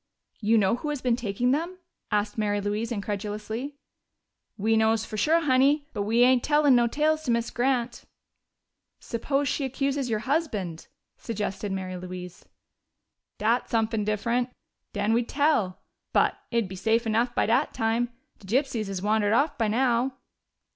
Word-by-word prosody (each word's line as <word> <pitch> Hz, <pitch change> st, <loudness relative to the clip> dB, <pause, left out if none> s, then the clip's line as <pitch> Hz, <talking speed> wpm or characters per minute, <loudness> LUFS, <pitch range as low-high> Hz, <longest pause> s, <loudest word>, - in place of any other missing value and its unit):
"You 225 Hz, +1 st, +3 dB
know 205 Hz, +2 st, +3 dB
who 300 Hz, -, -4 dB
has 295 Hz, -2 st, -2 dB
been 250 Hz, -2 st, +1 dB
taking 240 Hz, +1 st, 0 dB
them?" 335 Hz, +6 st, -1 dB, 0.3 s
asked 210 Hz, -1 st, 0 dB
Mary 205 Hz, -2 st, 0 dB
Louise 210 Hz, +3 st, -2 dB
incredulously. 215 Hz, +5 st, -4 dB, 0.8 s
"We 220 Hz, +2 st, +2 dB
knows 220 Hz, 0 st, +2 dB
fo' -, -, -7 dB
sure, 315 Hz, +11 st, +3 dB
Honey. 280 Hz, +1 st, +3 dB
But 205 Hz, -, -2 dB
we 225 Hz, +4 st, +3 dB
ain't 255 Hz, -1 st, +4 dB
tellin' 295 Hz, -3 st, +4 dB
no 240 Hz, -1 st, +4 dB
tales 305 Hz, +5 st, +1 dB
to -, -, -3 dB
Miz 235 Hz, 0 st, 0 dB
Grant." 245 Hz, -1 st, -1 dB, 0.9 s
"Suppose 275 Hz, +5 st, -1 dB
she 280 Hz, -, -1 dB
accuses 275 Hz, 0 st, -1 dB
your 215 Hz, -2 st, 0 dB
husband?" 220 Hz, -, -2 dB, 0.3 s
suggested 205 Hz, -2 st, -4 dB
Mary 185 Hz, -1 st, -4 dB
Louise. 180 Hz, 0 st, -8 dB, 0.9 s
"Dat's 230 Hz, +4 st, +1 dB
sumpin' 225 Hz, -2 st, 0 dB
diff'rent. 235 Hz, +4 st, 0 dB, 0.4 s
Den 205 Hz, +1 st, 0 dB
we'd 235 Hz, +1 st, +1 dB
tell. 285 Hz, -11 st, +1 dB, 0.3 s
But -, -, +3 dB
it'd 235 Hz, -4 st, 0 dB
be 190 Hz, -, -8 dB
safe 225 Hz, +5 st, +1 dB
enough 230 Hz, +2 st, +1 dB
by -, -, +2 dB
dat 225 Hz, +2 st, +2 dB
time. 230 Hz, +2 st, 0 dB, 0.3 s
De 195 Hz, -, -14 dB
gypsies 240 Hz, -1 st, 0 dB
has 195 Hz, -1 st, -4 dB
wandered 210 Hz, 0 st, +2 dB
off 285 Hz, +6 st, +2 dB
by 225 Hz, -, 0 dB
now." 245 Hz, +3 st, +1 dB
230 Hz, 155 wpm, -26 LUFS, 210-260 Hz, 0.9 s, ain't